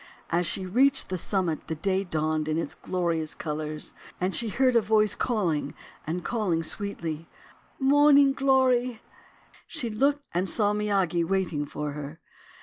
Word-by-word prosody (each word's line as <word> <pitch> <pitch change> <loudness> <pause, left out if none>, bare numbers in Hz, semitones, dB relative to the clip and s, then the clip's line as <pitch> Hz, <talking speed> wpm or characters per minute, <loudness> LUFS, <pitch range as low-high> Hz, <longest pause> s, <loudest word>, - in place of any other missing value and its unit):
As 175 0 +2
she 185 +3 0
reached 265 +9 +2
the 185 - -2
summit 180 -3 -2
the 160 - -3
day 190 +4 0
dawned 155 -3 -1
in 155 0 0
all 165 - 0
its - - -7
glorious 170 -4 -2
colours. 155 -1 -5 0.3
And 185 +1 -1
she 230 -2 +1
heard 255 +3 +2
a 230 - +6
voice 215 0 +3
calling, 175 - -1 0.3
and 170 +1 -3
calling 190 -8 0
sweetly: 165 -4 -3 0.2
— - - -33
"Morning 285 0 +5
Glory!" 255 -3 +2 0.6
She 250 -8 -3
looked 280 +6 +1
and 180 +2 0
saw 205 -2 +2
Miyagi 195 -5 +1
waiting 165 -5 -1
for 150 0 -4
her. 150 +2 -7
190 Hz, 155 wpm, -27 LUFS, 160-235 Hz, 0.6 s, a